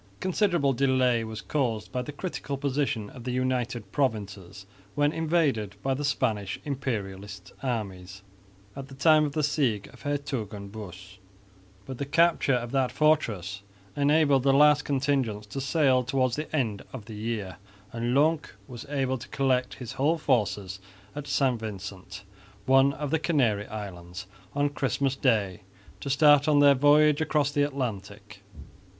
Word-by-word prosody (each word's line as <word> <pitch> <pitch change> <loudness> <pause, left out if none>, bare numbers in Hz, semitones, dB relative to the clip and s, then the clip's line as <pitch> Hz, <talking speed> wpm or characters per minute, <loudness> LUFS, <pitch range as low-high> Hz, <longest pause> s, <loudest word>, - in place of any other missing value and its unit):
A - - -30
considerable 175 -7 +1
delay 130 -3 +2
was 110 -1 -6
caused 120 -8 -2
by 125 - -2
the 125 - -6
critical 145 -3 -5
position 135 -6 -2
of 125 - -11
the 125 - -4
United 125 -4 -2
Provinces 100 -7 -3 0.3
when 145 +1 +2
invaded 150 - 0
by 135 - +1
the 140 +3 -3
Spanish 105 -7 -1
Imperialist 105 -9 -5
armies 100 -6 -4 0.5
at 135 -1 -7
the 135 - -12
time 155 +2 +5
of 145 - -4
the 155 - 0
siege 130 -9 0
of - - -17
Hertogenbosch, 105 - -5 0.7
but 130 +1 -7
the 140 - -2
capture 165 -3 +3
of 120 -1 -3
that 135 -2 +1
fortress 105 - +1 0.3
enabled 145 -1 +3
the 135 +1 +3
last 150 0 +5
contingents 130 -6 0
to 135 +6 -6
sail 135 -3 +2
towards 130 -1 0
the 150 +1 -5
end 110 -8 -1
of 120 -6 -8
the 115 - -9
year; 105 -3 -4 0.4
and 120 +2 -1
Lonck 155 +2 +1
was 125 +2 -9
able 135 -3 -1
to 125 - -10
collect 130 -2 0
his 125 -3 -8
whole 150 +5 +1
force 105 - -1 0.4
at 145 -1 -6
St 135 -4 +1
Vincent, 100 -3 -7 0.4
one 135 +1 +5
of 145 -1 -5
the 160 - +2
Canary 120 -11 +1
islands, 95 -2 -7 0.3
on 145 0 +2
Christmas 140 -1 -1
Day 105 -9 +1 0.4
to 140 - -5
start 145 +1 +5
on 150 -1 +4
their 145 -1 +7
voyage 145 +2 +4
across 150 -2 +1
the 145 - 0
Atlantic. 130 -8 -4
130 Hz, 155 wpm, -27 LUFS, 105-145 Hz, 0.7 s, their